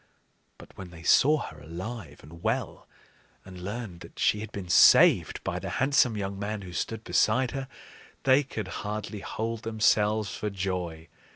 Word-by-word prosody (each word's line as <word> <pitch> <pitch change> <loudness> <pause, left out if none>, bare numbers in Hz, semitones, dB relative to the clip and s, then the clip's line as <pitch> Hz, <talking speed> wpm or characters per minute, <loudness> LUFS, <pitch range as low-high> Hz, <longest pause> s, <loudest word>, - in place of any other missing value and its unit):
But - - -15
when 95 -2 -9
they 85 -1 -13
saw 150 - +5
her 80 -2 -9
alive 85 +1 -7
and 85 +2 -13
well, 115 +1 -2 0.6
and 90 -1 -10
learned 100 -2 -6
that - - -13
she 105 - +2
had 110 0 -7
been 100 -3 -6
saved 85 - +6
by - - -2
the - - -5
handsome 130 -4 +3
young 100 -1 -4
man 105 0 -4
who 90 -2 -9
stood 110 +4 -3
beside 130 +2 +2
her, 135 -1 -4 0.6
they 135 +1 +5
could 120 -6 -6
hardly 105 0 -5
hold 115 +2 -4
themselves 110 -2 +1
for 105 - -3
joy. 90 -4 -4
105 Hz, 165 wpm, -27 LUFS, 90-115 Hz, 0.6 s, saved